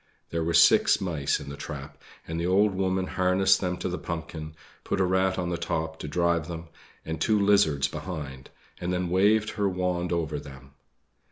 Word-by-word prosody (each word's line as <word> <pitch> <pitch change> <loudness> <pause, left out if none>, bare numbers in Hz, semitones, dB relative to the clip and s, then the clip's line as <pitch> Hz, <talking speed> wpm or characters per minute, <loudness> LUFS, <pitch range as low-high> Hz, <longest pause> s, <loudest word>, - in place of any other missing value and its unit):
There 85 -1 -1
were 85 +1 0
six - - +6
mice 80 -7 -1
in - - -8
the 70 - -6
trap, 70 -1 -7 0.3
and 80 0 -3
the 85 - -1
old 100 +2 +3
woman 95 0 0
harnessed 95 +1 +2
them 90 -2 -1
to - - -3
the 90 0 -3
pumpkin, 80 -2 -6 0.3
put - - -2
a - - +4
rat 95 +1 +1
on 90 -2 -1
the 85 -2 -2
top 80 -1 -3
to - - -6
drive 85 +1 +1
them, 85 -1 -7 0.4
and 80 0 -4
two 110 -1 +3
lizards 80 -9 +3
behind, 70 -5 -7 0.3
and 90 +1 -2
then 90 -1 -1
waved 105 +3 +3
her 100 -2 0
wand 90 -1 -1
over 80 -4 -1
them. 65 -1 -12
85 Hz, 190 wpm, -27 LUFS, 80-95 Hz, 0.4 s, six